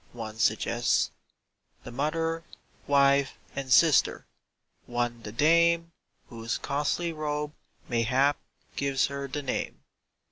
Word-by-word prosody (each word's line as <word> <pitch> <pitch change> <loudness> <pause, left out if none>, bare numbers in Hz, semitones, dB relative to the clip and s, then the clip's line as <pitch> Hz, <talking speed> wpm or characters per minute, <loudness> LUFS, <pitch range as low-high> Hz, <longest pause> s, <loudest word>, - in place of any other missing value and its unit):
One 110 -2 -7
suggests 120 +2 +1 0.7
The - - -8
Mother, 165 +5 -1 0.4
Wife, 140 0 +3 0.2
and 135 -1 -4
Sister! 155 +3 +4 0.6
One 120 -1 -2
the 105 - -7
dame 170 +6 +3 0.4
Whose 115 0 -3
costly 150 +4 -1
robe, 150 -1 -3 0.3
mayhap, 130 +4 +2 0.4
gives 140 -1 +1
her 140 0 -4
the 145 +2 -4
name. 130 - -3
140 Hz, 105 wpm, -28 LUFS, 120-155 Hz, 0.7 s, Sister